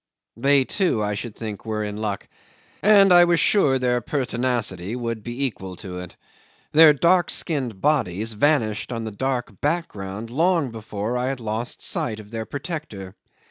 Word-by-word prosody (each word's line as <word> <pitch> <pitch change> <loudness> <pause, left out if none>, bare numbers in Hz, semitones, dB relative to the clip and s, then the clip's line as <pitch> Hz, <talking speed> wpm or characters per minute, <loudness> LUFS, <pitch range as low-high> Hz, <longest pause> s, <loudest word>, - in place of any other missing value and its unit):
They, 135 +2 +3
too, 175 - 0
I 105 0 -1
should 105 +2 -6
think, 110 -3 -6
were 110 -1 -2
in 105 -1 -4
luck, 105 -2 -4 0.5
and 200 -2 +6
I 175 0 +8
was 170 -1 +2
sure 145 -11 +3
their 125 -1 +1
pertinacity 120 -7 -1
would 115 -2 -3
be 120 +5 -3
equal 95 -7 -5
to 90 -1 -7
it. 90 -1 -9 0.6
Their 155 0 +8
dark 175 +4 +3
skinned 130 - -2
bodies 115 - 0
vanished 110 -3 +1
on 115 -1 -3
the 110 - -5
dark 120 -2 -3
background 115 - -3
long 165 -1 +1
before 110 +1 -4
I 125 - -1
had 135 -1 -2
lost 115 +1 -3
sight 110 -2 -1
of 105 0 -13
their 110 -1 -4
protector. 140 - -6
120 Hz, 165 wpm, -23 LUFS, 105-145 Hz, 0.6 s, I